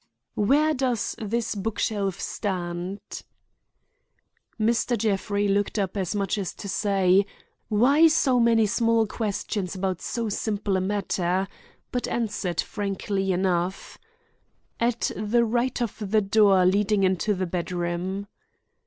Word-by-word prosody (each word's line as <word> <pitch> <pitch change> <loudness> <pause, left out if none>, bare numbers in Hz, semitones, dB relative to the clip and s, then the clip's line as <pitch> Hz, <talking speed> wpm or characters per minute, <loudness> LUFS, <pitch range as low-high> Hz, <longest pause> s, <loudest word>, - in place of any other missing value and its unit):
"Where 295 +8 +3
does 255 -5 -1
this 230 +2 -2
book 210 +1 -3
shelf 200 -4 -1
stand?" 180 -1 -3 1.6
Mr. 230 +2 +1
Jeffrey 205 -1 0
looked 200 +2 0
up 195 -2 -1
as 195 0 -2
much 200 +1 -1
as 190 -4 -4
to 200 - -8
say, 195 0 +2 0.4
"Why 270 +9 +5
so 275 -5 +3
many 230 -2 +4
small 230 +1 +2
questions 205 -3 -3
about 185 -2 -2
so 235 -1 -2
simple 205 -1 -1
a 185 - +1
matter?" 190 -1 -1 0.4
but 245 - -2
answered 210 -7 -1
frankly 195 -1 -2
enough: 180 0 -1 0.8
"At 235 0 0
the 225 +3 +2
right 240 +3 0
of 225 - -5
the 215 +1 +3
door 195 -2 +4
leading 200 +2 +2
into 190 +2 +1
the 185 0 -1
bedroom." 180 +2 -3
205 Hz, 125 wpm, -25 LUFS, 190-225 Hz, 1.6 s, Why